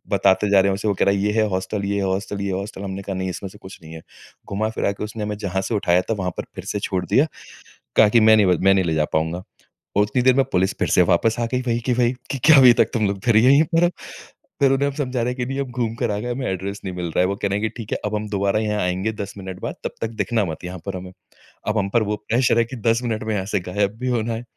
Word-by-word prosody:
बताते 100 +1 +3
जा 100 - +6
रहे 100 - +2
हैं - - +1
उसे, 100 +2 -3
वो 100 - +2
कह - - +1
रहा 100 - +3
है, 100 - -1
"ये 105 +1 +1
है 110 -1 +3
हॉस्टल, 100 +2 -3
ये 100 +1 -1
है 100 - 0
हॉस्टल, 100 +1 -2
ये 100 - -2
है 95 - -2
हॉस्टल?" 100 0 -7
हमने 95 0 -5
कहा, 100 0 -5
"नहीं 95 0 -2
इसमें 95 +2 -6
से 105 - -15
कुछ 95 -1 -12
नहीं 80 +1 -11
है।" 80 - -9 0.5
घुमा-फिरा 110 0 -1
के - - -7
उसने 105 0 -6
हमें 105 0 -3
जहाँ 95 0 -1
से 115 - 0
उठाया 90 -3 +2
था, 115 - -2
वहाँ 95 -4 -2
पर - - -3
फिर - - -8
से 105 - -1
छोड़ 95 -2 -1
दिया। 145 +4 +3 0.7
कहा 110 - +7
कि, 115 - +5
"मैं 110 0 +6
नहीं 105 - +4
व 90 -2 +3
मैं 95 0 +5
नहीं 95 -2 +2
ले 80 - 0
जा 75 -1 +2
पाऊँगा।" 80 +3 -2 0.5
और 105 - +5
उतनी 105 +4 0
देर 130 0 +6
में 135 - +3
पुलिस 95 +1 +1
फिर - - +1
से - - +4
वापस 110 +6 +2
आ 120 - +1
गई 125 - +1
वही 115 0 +1
की 125 - +3
वही 120 0 +2 0.2
कि 135 - -2
"क्या 160 -2 +8
अभी 125 -2 +8
तक - - +2
तुम 110 -3 +1
लोग 100 -1 -2
फिर 115 -3 +4
यहीं 135 +6 +6
पर 165 - +4
हो?" 175 - +4 0.7
फिर 135 -1 +4
उन्हें 140 +1 +2
हम 140 - -5
समझा 125 -4 -2
रहे 125 +1 0
हैं - - -8
कि, 125 - -1
"नहीं 135 +1 -4
हम 135 -2 -4
घूम 115 -2 -2
कर 120 -3 -1
आ 100 - -2
गए, 120 - -4
हमें 130 +1 -4
एड्रेस 100 +2 -4
नहीं 95 -1 -4
मिल 90 -1 -3
रहा 80 - -4
है।" - - +4
वो 100 - -1
कह 100 - +2
रहे 100 +1 -1
हैं 110 - 0
कि, - - -29
"ठीक 115 -3 -7
है, - - 0
अब 105 - -3
हम 105 0 -4
दोबारा 100 +1 +1
यहाँ 105 -1 -1
आएँगे 95 +4 -1
10 100 -2 -6
मिनट 95 -1 -7
बाद, - - -4
तब - - -3
तक 115 - -1
दिखना 115 -4 0
मत 80 +2 -6
यहाँ 90 +1 -6
पर 95 -1 -3
हमें।" 90 0 -8 0.6
अब 105 - 0
हम 100 -1 -1
पर 115 - +4
वो 105 0 -1
प्रेशर 120 0 +3
है 115 - +3
कि - - -5
10 115 +1 +2
मिनट 110 -3 -2
में 110 0 -2
यहाँ 95 -1 -2
से - - +3
गायब 100 +1 0
भी 130 - -3
होना 115 +1 -2
है। 115 +2 -5
105 Hz, 320 wpm, -22 LUFS, 95-115 Hz, 0.7 s, क्या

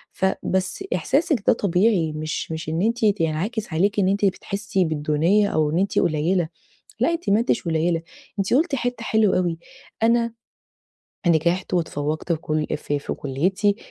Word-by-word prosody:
ف - - 0 0.2
بس 190 0 -1
إحساسِك 270 - +1
ده - - +7
طبيعي 190 -4 +2
مش 155 +1 -4
مش 160 -1 -4
إن 160 +3 -1
أنتِ 230 +2 0 0.2
ينعكس 180 +6 -2
عليكِ 200 +6 +1
إن 185 - +3
أنتِ 200 +2 +2
بتحسي 195 0 -1
بالدونية 160 +6 +2
أو 155 -5 +1
إن 165 - +1
أنتِ 195 +1 +1
قليلة، 165 +2 +1 0.5
لأ، - - +3
أنتِ 335 -6 -3
ما 205 +2 +4
أنتِش 230 0 +1
قليلة، 165 0 0 0.4
أنتِ 195 +2 0
قلتِ 300 +3 +2
حتة 245 -2 -3
حلوة 220 -4 +2
أوي، 175 -2 -1 0.4
"أنا 230 0 +3 0.9
نجحت 170 +3 +2
وتفوقت 155 -1 -1
في 165 - 0
كل 155 -1 -1
في 145 - -2 0.2
كليتي" 185 +9 0
185 Hz, 155 wpm, -23 LUFS, 160-210 Hz, 0.9 s, ده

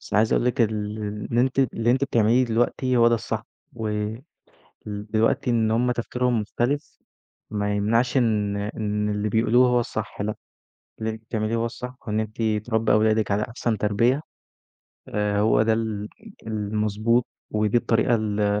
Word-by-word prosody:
بس - - -8
عايز 110 +2 +3
أقول - - +2
لِك 125 +1 0
ال 110 -2 +4 0.6
اللي 120 - +2
أنتِ 130 +1 0
اللي 120 -3 +2
أنتِ 130 +3 +2
بتعمليه 120 0 +3
دلوقتي 120 +2 0
هو 115 0 +6
ده 120 - +3
الصح، 110 - -3 0.3
و 115 -2 -4
ال 105 +3 -3 0.6
دلوقتي 105 +3 0
إن 110 -2 +2
هُم 125 +2 +2
تفكيرهم 125 0 0
مختلف 125 +7 -2 0.5
ما 105 -1 -1
يمنعش 115 +5 +1
إن 105 -4 +1
إن 105 0 -2
اللي 105 +1 -1
بيقولوه 120 +3 +4
هو 125 0 +3
الصح 110 -3 -4
لأ، 105 +1 -2 0.6
اللي 110 0 -2
أنتِ 110 0 -6
بتعمليه 110 0 -1
هو 115 - 0
الصح، 125 +2 -6
وإن 105 +1 0
أنتِ 110 +2 -4 0.3
تربّي 110 -1 +1
أولادِك 110 -1 +3
على 105 +2 +1
أحسن 115 -2 -2
تربيّة 115 +8 +2 0.9
آآ 105 -1 0
هو 110 +1 +4
ده 110 0 +2
ال 110 -2 -2 0.4
المضبوط، 110 +2 0 0.2
ودي 105 +1 +1
الطريقة 120 0 +2
ال 105 -2 0
110 Hz, 160 wpm, -24 LUFS, 105-120 Hz, 0.9 s, هو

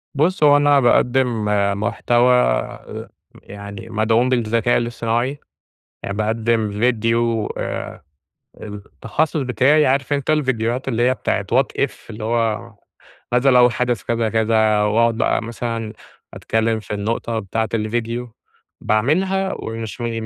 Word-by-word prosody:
بُص 160 +3 +1
هو 145 -1 +7
أنا 145 -1 +4
باقدِّم 120 -2 +2 0.4
محتوى 120 +3 +2 1.1
يعني 100 +2 -9
مدعوم 115 +3 +1
بالذكاء 115 -1 +1
الإصطناعي، 120 +3 -2 0.6
يعني 100 +1 -4
باقدم 110 0 0 0.2
ڤيديو 115 -1 0
آآ - - -5 0.6
التخصص 110 +9 -3
بتاعي 130 +5 +3
عارف 135 +1 +1
أنت 140 +1 -1
الڤيديوهات 130 -4 0
اللي 120 -2 0
هي - - +2
بتاعة 100 -5 -2
what 135 +1 +1
if؟ - - -11 0.2
اللي 110 0 -7
هو 115 0 -1 0.6
ماذا 125 +2 +3
لو 125 -1 +6
حدث 120 -2 -1
كذا، 115 -1 -1
كذا؟ 110 -1 +2
وأقعد 115 +2 +2
بقى - - +1
مثلًا 115 -1 -4 0.4
أتكلّم 110 0 -1
في 105 - -7
النقطة 115 +2 -2
بتاعة 110 +2 -2
الڤيديو، 115 +2 -2 0.5
باعملها 190 - +1
ومش 115 -3 -6
مش 120 - -2
115 Hz, 120 wpm, -20 LUFS, 110-125 Hz, 1.1 s, هو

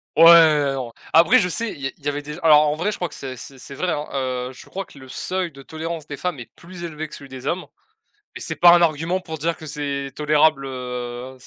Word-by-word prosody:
Ouais, 160 -4 +7
non, 125 -3 -5 0.2
après, 170 +10 +6
je 180 - 0
sais, 230 +4 -2
il 140 - -11
y 135 - -1
a - - -6
il 140 - -21
y - - -1
avait 145 0 -1
déj 150 +2 -8
alors 150 -1 +6
en 150 - 0
vrai 175 +7 -1
je - - -6
crois 175 - -3
que - - -12
c'est 130 -1 -7
c'est 135 +2 -11
c'est 135 - -10
vrai 180 +6 -2
hein, 150 - -2
heu, 130 -2 -2
je - - -14
crois 195 +1 -5
que 140 - -16
le 130 - -13
seuil 185 +6 -3
de 135 -1 -13
tolérance 160 +1 -6
des 145 -2 -7
femmes 180 0 -3
est 120 - -11
plus 175 0 -11
élevé 155 -2 -5
que 150 - -11
celui 140 - -12
des 130 0 -8
hommes, 180 +4 -1 0.7
et - - -6
c'est - - -3
pas 175 -1 +7
un 175 - +6
argument 165 +2 +1
pour 160 -3 -7
dire 165 +3 -1
que 155 - -11
c'est 140 -2 -4
tolérable, 150 -1 +3
heu, 125 0 -6
150 Hz, 265 wpm, -22 LUFS, 135-170 Hz, 0.7 s, Ouais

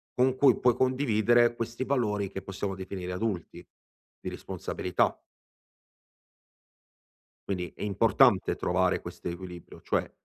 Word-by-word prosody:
con 130 +1 +3
cui 135 -3 +5
puoi 125 -2 +4
condividere 120 -2 +3
questi 115 +1 -3
valori, 105 -7 0
che 95 - -5
possiamo 95 +1 -4
definire 95 -1 -6
adulti, 90 -3 -4 0.5
di - - -5
responsabilità. 90 -1 -2 2.3
Quindi 90 -3 -3
è - - -7
importante 100 -2 +3
trovare - - +1
quest'equilibrio, 90 0 -8
cioè, - - -1
105 Hz, 105 wpm, -28 LUFS, 90-120 Hz, 2.3 s, cui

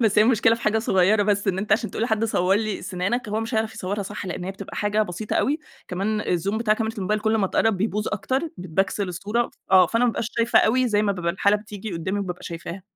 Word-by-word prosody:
بس 215 -3 +3
هي - - +8
المشكلة 225 -1 +4
في 230 - -8
حاجة 215 +1 +2
صغيرة 205 0 +3
بس، 205 0 +1
إن 190 - 0
أنت 210 +2 0
عشان 225 +1 +1
تقول - - -3
لحد 220 -1 +1
صوّر 190 -4 +2
لي 215 -2 -2
سِنانك، 195 +7 -2
هو 215 +1 -1
مش 225 +2 -4
هيعرف 220 0 0
يصوّرها 205 -1 -3
صح 205 0 -6
لإن 180 0 -4
هي 190 - -3
بتبقى 195 0 -9
حاجة 210 +1 +1
بسيطة 210 +2 -4
أوي. 295 +4 +1 0.3
كمان 200 +4 -1
الزوم 200 +3 -1
بتاع 215 -2 +2
كاميرا 225 0 -2
الموبايل 210 +1 -1
كل 220 +1 +1
أما 210 -3 +2
تقرّب 220 +2 +2
بيبوّظ 210 +2 -1
أكتر، 260 +6 -1 0.2
بتبكسل 185 +3 -1
الصورة 210 +7 -1
ف - - -24 0.2
آه. 185 -1 +8
فأنا 230 +7 +1
ما 245 - +4
بابقاش 230 0 -3
شايفة 230 0 +4
أوي 255 +3 +3
زي 210 -2 +2
ما 205 -1 +2
بيبقى 170 -3 -2
الحالة 200 +2 +3
بتيجي 210 -1 -8
قُدّامي 185 +4 -2
وبابقى 180 -3 -4
شايفاها. 170 +2 -7
210 Hz, 245 wpm, -24 LUFS, 190-220 Hz, 0.3 s, هي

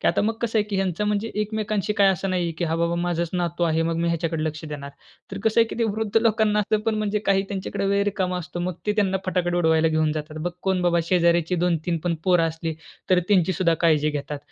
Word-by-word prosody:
की - - -1
आता - - +1
मग 220 +2 0
कसं 225 -1 +1
आहे 210 - +2
की 200 - -2
ह्यांचा 190 0 -1
म्हणजे 210 +2 -1
एकमेकांशी 210 -1 -2
काय 200 -2 +4
असं 190 +2 -3
नाहीये, 175 -2 0
की 175 - 0
"हा 165 0 -1
बाबा, 170 0 0
माझाच 170 -1 -1
नातू 175 -1 -2
आहे. 165 -1 +1
मग 165 0 -1
मी 170 +1 0
ह्याच्याकडे 165 -1 -1
लक्ष 155 0 -4
देणार." 145 -2 -7 0.4
तर 195 - -4
कसं 220 +1 +4
आहे 230 - +4
की - - -7
ते 230 - +2
वृद्ध 220 0 -2
लोकांना 220 -2 +2
असतं 210 +1 +1
पण, 225 - +2
म्हणजे 215 -1 0
काही 195 -1 +3
त्यांच्याकडे 195 0 -3
वेळ 200 0 +2
रिकामा 185 -3 -1
असतो. 175 0 -6
मग 180 +1 -2
ते 210 - +2
त्यांना 195 -3 +2
फटाके 175 -1 0
उडवायला 160 -1 +3
घेऊन 155 -1 +1
जातात. 155 0 -5
बघ - - 0
कोण 190 -1 +1
बाबा, 170 -1 +3
शेजाऱ्याची 170 -1 +3
2-3 170 -1 0
पण 175 -1 +1
पोरं 180 -2 +4
असली, 160 0 -4 0.4
तर 185 - +5
त्यांचीसुद्धा 185 -3 +3
काळजी 155 -2 +3
घेतात. 145 0 -4
180 Hz, 235 wpm, -24 LUFS, 165-205 Hz, 0.4 s, तर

